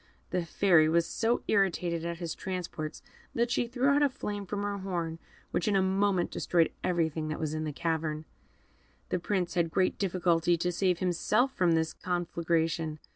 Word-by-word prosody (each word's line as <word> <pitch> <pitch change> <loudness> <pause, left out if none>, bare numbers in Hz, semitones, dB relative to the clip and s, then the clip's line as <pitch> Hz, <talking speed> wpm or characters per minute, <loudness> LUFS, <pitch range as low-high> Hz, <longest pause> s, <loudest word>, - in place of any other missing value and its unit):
The 180 -1 0
Fairy 165 -3 +4
was 170 +1 +3
so 230 +7 0
irritated 175 -4 +1
at 170 0 -3
his 170 -2 -4
transports, 175 -5 -5 0.3
that 235 +1 +1
she 240 - +1
threw 250 +3 +1
out 285 +1 +4
a 290 - +4
flame 205 -5 -5
from 205 +1 -3
her 205 0 -2
horn, 170 -4 -3 0.3
which 175 - 0
in 205 - +2
a 195 - +4
moment 190 -1 +1
destroyed 170 -2 +2
everything 160 -3 0
that 155 - -3
was 155 -1 -2
in 155 0 -2
the 155 - -2
cavern. 155 0 -2 0.8
The 180 - 0
Prince 180 -1 -1
had 170 -3 +1
great 185 +2 +1
difficulty 175 -3 +2
to 180 +2 0
save 180 0 +1
himself 210 +9 +1
from 175 -2 +2
this 160 -1 +1
conflagration. 165 -3 -1
175 Hz, 180 wpm, -30 LUFS, 165-195 Hz, 0.8 s, Fairy